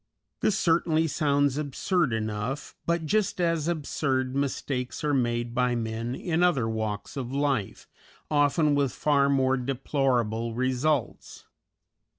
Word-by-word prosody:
This 210 - +1
certainly 165 -2 +2
sounds 145 -2 +1
absurd 150 +2 0
enough; 110 +4 -3
but 170 -1 0
just 205 +2 0
as 165 -3 +1
absurd 140 -5 -1
mistakes 135 -2 -2
are 150 -1 +1
made 120 -2 0
by 125 0 +1
men 115 +1 -3
in 170 +1 -1
other 150 -10 +3
walks 110 -2 -3
of 130 -3 -4
life, 135 -7 -1 0.4
often 145 +1 +3
with 140 -2 +1
far 140 -2 +2
more 135 -1 +2
deplorable 120 -3 -1
results. 130 +2 -1
135 Hz, 125 wpm, -27 LUFS, 120-150 Hz, 0.4 s, other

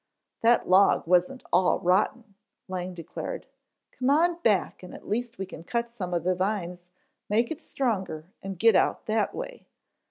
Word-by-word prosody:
"That 235 +1 +4
log 190 +2 +5
wasn't 180 +9 +2
all 185 - +4
rotten," 200 +5 +1 0.3
Lang 185 -1 -4
declared. 175 - -6 0.5
"Come 255 +1 -1
on 335 +4 +3
back 210 - +1
and 180 - -10
at - - -13
least 235 +2 -2
we 195 - -3
can 165 -3 -10
cut 235 +5 -2
some 185 -6 -5
of 170 -2 -1
the 185 +1 +2
vines, 180 -2 -3 0.4
make 230 +5 +2
it 320 +1 -5
stronger 190 - -2 0.2
and 195 -1 -6
get 225 +2 +5
out - - +2
that 215 -1 0
way." - - -7
200 Hz, 165 wpm, -27 LUFS, 180-235 Hz, 0.5 s, log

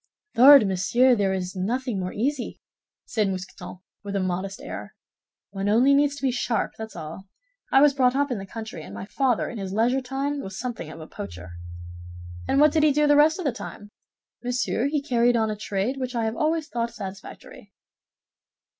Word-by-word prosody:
"Lord, 270 -2 +9
monsieur! 235 +7 +3
There 200 -3 +1
is 185 0 -3
nothing 230 +3 -2
more 185 0 -3
easy," 260 +4 -2 0.5
said 215 -3 0
Mousqueton, 185 -1 -7 0.2
with 200 0 -5
a - - +1
modest 185 +1 -3
air. - - -8 0.6
"One 195 0 -2
only 245 +6 +5
needs 285 0 +3
to 285 - -11
be 265 - +2
sharp, 240 -2 -1
that's 220 -2 -8
all. 165 +4 -8 0.4
I 270 - +6
was 290 -1 +6
brought 255 -2 +2
up 285 0 +1
in 235 - -2
the 195 - -8
country, 220 -5 -7
and - - -10
my - - -6
father 250 +2 0
in 235 - -6
his 190 -1 -5
leisure 240 +5 +2
time 275 +3 -3
was 190 -4 -7
something 245 0 -5
of - - -10
a 155 - -8
poacher." 90 - -9 1.0
"And 275 - +2
what 300 0 +6
did 315 - +2
he 305 -1 +5
do 300 +2 +2
the 290 0 +5
rest 305 +2 +5
of 370 - -5
his 275 - +1
time?" 205 -4 -9 0.5
"Monsieur, 245 0 0
he 290 0 -1
carried 245 -3 +2
on 220 -1 +1
a - - -3
trade 210 +4 -2
which 255 -1 -4
I 230 -1 0
have 220 +1 -2
always 315 0 0
thought 235 0 -2
satisfactory." 195 -3 -10
235 Hz, 200 wpm, -25 LUFS, 195-270 Hz, 1.0 s, Lord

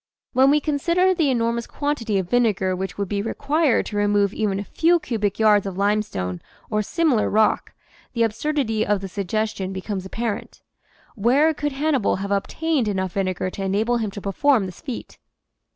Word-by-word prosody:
When 265 +1 +5
we 295 +1 +4
consider 340 +6 +2
the 335 -3 +1
enor 230 -2 +1
mous 235 0 -4
quantity 265 -8 -1
of 190 -2 -1
vinegar 200 -4 +1
which 190 +1 -5
would 200 -1 -2
be 200 +1 -1
required 285 +5 +1
to 210 - -5
re 205 0 +2
move 205 -1 +2
even 205 -3 -1
a - - -3
few 340 - +2
cubic 210 - -2
yards 210 -2 +4
of 190 -1 -5
limestone 195 - -1 0.3
or 215 0 +1
similar 285 - +1
rock, 215 0 +2 0.4
the 235 -2 +2
absurdity 225 -1 0
of 205 -2 0
the 195 - -4
suggestion 200 0 -2
becomes 190 0 -4
apparent. 225 +3 -5 0.5
Where 265 +9 +3
could 295 -1 -3
Hannibal 275 -5 +1
have 195 +1 -4
obtained 275 +6 0
enough 190 -3 -1
vinegar 185 -1 -1
to 195 - -5
enable 215 +5 +1
him 220 -3 -2
to 200 +1 -8
perform 225 +3 +2
this 185 -2 -9
feat? 255 -5 -7
215 Hz, 180 wpm, -23 LUFS, 200-270 Hz, 0.5 s, When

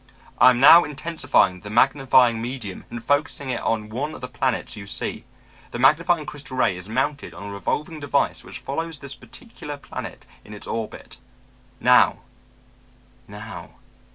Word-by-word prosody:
'I - - +8
am 125 -1 +2
now 165 +6 +9
intensifying 140 - 0
the 105 - -10
magnifying 130 -1 +4
medium 120 -5 -6
and 120 -1 -7
focusing 145 -1 0
it 120 - -3
on 110 -2 -1
one 140 +7 -4
of - - -11
the 125 - -5
planets 125 -1 -2
you 100 -1 -9
see. - - -3 0.4
The - - -6
magnifying 155 +5 +3
crystal 135 -1 -8
ray 110 - +2
is 90 +3 -9
mounted 130 - -2
on 95 - -9
a 100 - -7
revolving 150 +10 -3
device 145 -2 0
which - - -8
follows 160 +3 -4
this 140 -1 -8
particular 145 - -10
planet - - -8 0.2
in 105 - -11
its 105 - -9
orbit. 115 -2 -6 0.6
Now... - - +4 1.1
now....' - - -10
130 Hz, 155 wpm, -23 LUFS, 115-145 Hz, 1.1 s, now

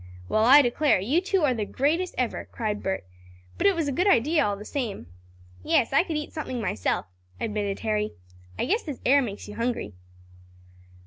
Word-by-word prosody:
"Well, 215 - +2
I 280 +4 +8
declare; 255 0 +2
you 265 - +1
two 385 -2 0
are 275 -4 +3
the 220 -3 -2
greatest 315 - 0
ever!" 250 -2 -1
cried 210 -2 -3
Bert. 190 - -3 0.5
"But - - +4
it 395 - +4
was 325 -3 -1
a - - 0
good 355 +9 +1
idea 310 - +4
all 205 -1 -1
the 210 - -10
same!" 235 - -4 0.6
"Yes, 225 - +2
I 275 - +6
could 330 -4 -3
eat 300 - -5
something 280 -6 -4
myself," 110 - -1 0.3
admitted 205 -3 -2
Harry. 215 -1 -1 0.4
"I - - 0
guess 430 - +1
this 290 -6 -7
air 280 +2 +5
makes 210 -6 -5
you 210 - -8
hungry." 230 - -2
250 Hz, 190 wpm, -26 LUFS, 210-305 Hz, 0.6 s, I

